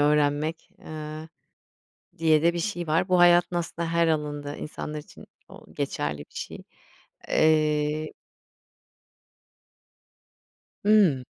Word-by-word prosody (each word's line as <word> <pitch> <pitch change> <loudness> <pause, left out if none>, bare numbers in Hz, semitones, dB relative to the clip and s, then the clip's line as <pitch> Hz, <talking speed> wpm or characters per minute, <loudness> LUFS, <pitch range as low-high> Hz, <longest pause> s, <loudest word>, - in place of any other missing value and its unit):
öğrenmek, 150 +2 +1
eee, 155 0 -8 0.9
diye 160 -1 +3
de 170 +1 +4
bir 170 - -3
şey 175 -3 -3
var. 165 +4 +1
Bu 180 - +4
hayatın 175 0 +5
aslında 170 -1 -3
her 170 0 +3
alanında 145 -2 -2
insanlar 150 0 -6
için 150 - -14 0.2
o - - -15
geçerli 75 0 -2
bir 75 - -13
şey. - - -6 0.7
Eee 155 0 +2 2.7
Hıı. 195 -12 +4
155 Hz, 105 wpm, -26 LUFS, 150-170 Hz, 2.7 s, hayatın